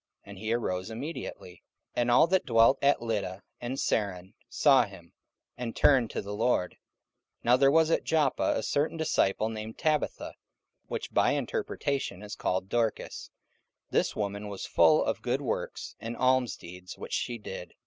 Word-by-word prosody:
And 100 Hz, -1 st, -11 dB
he 110 Hz, +2 st, -3 dB
arose 95 Hz, -4 st, -1 dB
immediately. 115 Hz, -, -7 dB, 0.3 s
44:009:035 -, -, +1 dB
And 120 Hz, -, +1 dB
all 120 Hz, +6 st, +6 dB
that 185 Hz, +2 st, +1 dB
dwelt 115 Hz, +2 st, +5 dB
at 140 Hz, -3 st, +3 dB
Lydda 100 Hz, -4 st, -3 dB, 0.2 s
and 125 Hz, +2 st, -4 dB
Saron 95 Hz, -7 st, -1 dB, 0.2 s
saw 135 Hz, -4 st, +5 dB
him, 95 Hz, -5 st, -14 dB, 0.4 s
and 120 Hz, -2 st, -5 dB
turned 130 Hz, -6 st, +4 dB
to -, -, -4 dB
the 100 Hz, +1 st, -6 dB
Lord. 105 Hz, -4 st, +1 dB
44:009:036 -, -, -24 dB, 0.6 s
Now 120 Hz, +2 st, +5 dB
there 135 Hz, +1 st, +5 dB
was 160 Hz, +1 st, +4 dB
at -, -, +2 dB
Joppa 150 Hz, -4 st, +2 dB
a 110 Hz, -, -2 dB
certain 150 Hz, +7 st, 0 dB
disciple 110 Hz, -9 st, +1 dB
named 110 Hz, 0 st, -6 dB
Tabitha, 155 Hz, -, -1 dB, 0.5 s
which -, -, -5 dB
by -, -, +3 dB
interpretation 140 Hz, -, -2 dB
is 105 Hz, -, -7 dB
called 95 Hz, +1 st, -1 dB
Dorcas: 115 Hz, 0 st, -2 dB, 0.6 s
this -, -, +1 dB
woman 100 Hz, 0 st, -3 dB
was 100 Hz, -2 st, -6 dB
full -, -, +4 dB
of -, -, -1 dB
good -, -, -1 dB
works -, -, -4 dB
and 115 Hz, +1 st, -6 dB
almsdeeds 120 Hz, -9 st, -1 dB
which -, -, -8 dB
she 120 Hz, -, -1 dB
did. 95 Hz, -4 st, -8 dB
115 Hz, 165 wpm, -29 LUFS, 100-135 Hz, 0.6 s, all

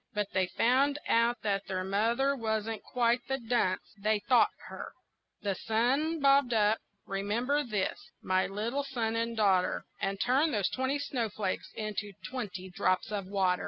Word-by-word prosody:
But 210 Hz, -1 st, 0 dB
they 185 Hz, -1 st, +2 dB
found 265 Hz, +8 st, +2 dB
out 235 Hz, +1 st, +2 dB
that 200 Hz, -2 st, -1 dB
their 185 Hz, -1 st, -2 dB
mother 230 Hz, +8 st, +1 dB
wasn't 220 Hz, -2 st, -2 dB
quite 240 Hz, 0 st, +1 dB
the 270 Hz, -, 0 dB
dunce 230 Hz, -6 st, 0 dB
they 215 Hz, +1 st, +1 dB
thought 245 Hz, +4 st, +4 dB, 0.2 s
her, -, -, -8 dB, 0.5 s
The 200 Hz, -1 st, +1 dB
sun 255 Hz, -, +1 dB
bobbed 275 Hz, -3 st, +4 dB
up 215 Hz, 0 st, +3 dB, 0.3 s
remember 230 Hz, +9 st, 0 dB
this, 210 Hz, -6 st, -1 dB, 0.2 s
my 185 Hz, 0 st, +1 dB
little 230 Hz, +8 st, -2 dB
son 235 Hz, -5 st, -2 dB
and 230 Hz, 0 st, -1 dB
daughter 195 Hz, -4 st, +2 dB, 0.2 s
And 195 Hz, 0 st, -1 dB
turned 275 Hz, +5 st, +2 dB
those 200 Hz, -3 st, +1 dB
twenty 260 Hz, +2 st, -1 dB
snowflakes 225 Hz, -8 st, -2 dB
into 210 Hz, -2 st, -4 dB
twenty 210 Hz, -7 st, -5 dB
drops 185 Hz, +3 st, 0 dB
of 200 Hz, -3 st, -3 dB
water. 190 Hz, -2 st, +1 dB
220 Hz, 155 wpm, -30 LUFS, 200-250 Hz, 0.5 s, thought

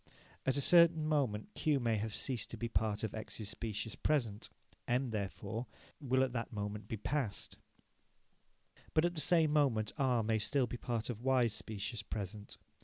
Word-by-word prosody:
At 130 Hz, +1 st, +3 dB
a -, -, +2 dB
certain 170 Hz, 0 st, +6 dB
moment 140 Hz, -, 0 dB
Q 150 Hz, -3 st, +1 dB
may 115 Hz, -3 st, +1 dB
have 105 Hz, 0 st, -3 dB
ceased 125 Hz, -5 st, -1 dB
to 115 Hz, -, -7 dB
be 115 Hz, -, -2 dB
part 110 Hz, -2 st, 0 dB
of 110 Hz, -, -2 dB
X's 110 Hz, -1 st, -5 dB
specious 110 Hz, 0 st, -3 dB
present. 115 Hz, -9 st, 0 dB, 0.4 s
M, 125 Hz, +1 st, +1 dB
therefore, 110 Hz, +2 st, -4 dB, 0.3 s
will 130 Hz, -2 st, +2 dB
at 130 Hz, -2 st, -1 dB
that 115 Hz, -2 st, -3 dB
moment 105 Hz, 0 st, -4 dB
be 110 Hz, -, -3 dB
past. 120 Hz, -1 st, -3 dB, 1.4 s
But 155 Hz, +1 st, +5 dB
at 175 Hz, -, +1 dB
the 155 Hz, -, +1 dB
same 160 Hz, -3 st, +5 dB
moment 120 Hz, -8 st, +2 dB
R 125 Hz, -4 st, +3 dB
may 110 Hz, 0 st, +1 dB
still 135 Hz, +5 st, +1 dB
be 120 Hz, +1 st, -5 dB
part 120 Hz, 0 st, -2 dB
of 115 Hz, -1 st, -8 dB
Y's 125 Hz, -4 st, +3 dB
specious 110 Hz, +2 st, -4 dB
present. 105 Hz, -1 st, -6 dB
115 Hz, 175 wpm, -35 LUFS, 110-135 Hz, 1.4 s, certain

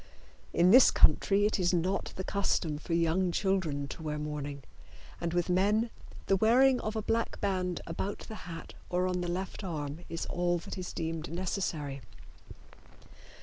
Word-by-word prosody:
In 175 Hz, +2 st, +4 dB
this 255 Hz, +3 st, +9 dB
country 195 Hz, +6 st, +4 dB
it 210 Hz, -, +1 dB
is 180 Hz, 0 st, +2 dB
not 185 Hz, +3 st, -1 dB
the 190 Hz, -, -4 dB
custom 180 Hz, -6 st, 0 dB
for 165 Hz, +2 st, -2 dB
young 170 Hz, +2 st, +2 dB
children 170 Hz, -7 st, 0 dB
to -, -, -8 dB
wear 150 Hz, -1 st, -3 dB
mourning, 145 Hz, -2 st, -5 dB, 0.6 s
and 170 Hz, -1 st, -1 dB
with 175 Hz, 0 st, 0 dB
men 205 Hz, +5 st, +2 dB, 0.3 s
the 195 Hz, -, +3 dB
wearing 250 Hz, +5 st, +5 dB
of 215 Hz, +1 st, -3 dB
a 220 Hz, -, -2 dB
black 230 Hz, +1 st, -1 dB
band 185 Hz, -3 st, -1 dB
about 190 Hz, +4 st, -3 dB
the 215 Hz, -5 st, -8 dB
hat 165 Hz, -1 st, -8 dB, 0.2 s
or 180 Hz, +1 st, +1 dB
on 180 Hz, -1 st, -1 dB
the 175 Hz, -, -2 dB
left 190 Hz, +3 st, -4 dB
arm 150 Hz, -4 st, -4 dB
is 165 Hz, 0 st, -3 dB
all 175 Hz, 0 st, 0 dB
that 170 Hz, -, -7 dB
is 185 Hz, -2 st, -5 dB
deemed 165 Hz, -1 st, -4 dB
necessary. 165 Hz, -6 st, -3 dB
180 Hz, 165 wpm, -31 LUFS, 165-195 Hz, 0.6 s, this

